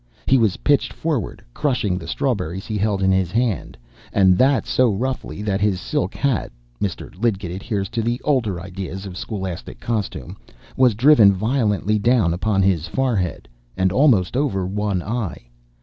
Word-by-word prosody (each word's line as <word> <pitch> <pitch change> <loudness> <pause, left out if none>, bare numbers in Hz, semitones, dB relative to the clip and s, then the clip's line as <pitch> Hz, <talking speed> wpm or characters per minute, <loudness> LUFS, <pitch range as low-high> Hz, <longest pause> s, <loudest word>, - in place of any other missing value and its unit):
He 135 - +4
was 110 -5 +2
pitched 145 -1 +1
forward, 150 - -3
crushing 105 -10 0
the 85 - -9
strawberries 95 - -2
he 110 - -4
held 100 -1 0
in 95 - +4
his 95 -2 +1
hand, 115 - -1 0.3
and 95 -2 +4
that 135 +1 +3
so 125 -3 +2
roughly, 105 -4 -3
that 100 -2 -1
his 100 -3 +1
silk 145 +9 -2
hat 135 -6 0 0.3
Mr. 95 -3 -4
Lidgett 100 -7 0
adheres 100 +1 -3
to 115 0 -2
the 120 +2 -1
older 115 -11 0
ideas 95 +1 -6
of 95 -2 -7
scholastic 95 -3 -6
costume 110 -4 -4 0.4
was 125 -4 +4
driven 115 -4 +6
violently 105 -1 0
down 110 -6 +3
upon 95 +2 +1
his 90 -4 +1
forehead, 115 -10 -1 0.3
and 95 0 +2
almost 120 - +3
over 125 -10 0
one 100 -1 -1
eye. 105 - -4
105 Hz, 160 wpm, -21 LUFS, 95-120 Hz, 0.4 s, driven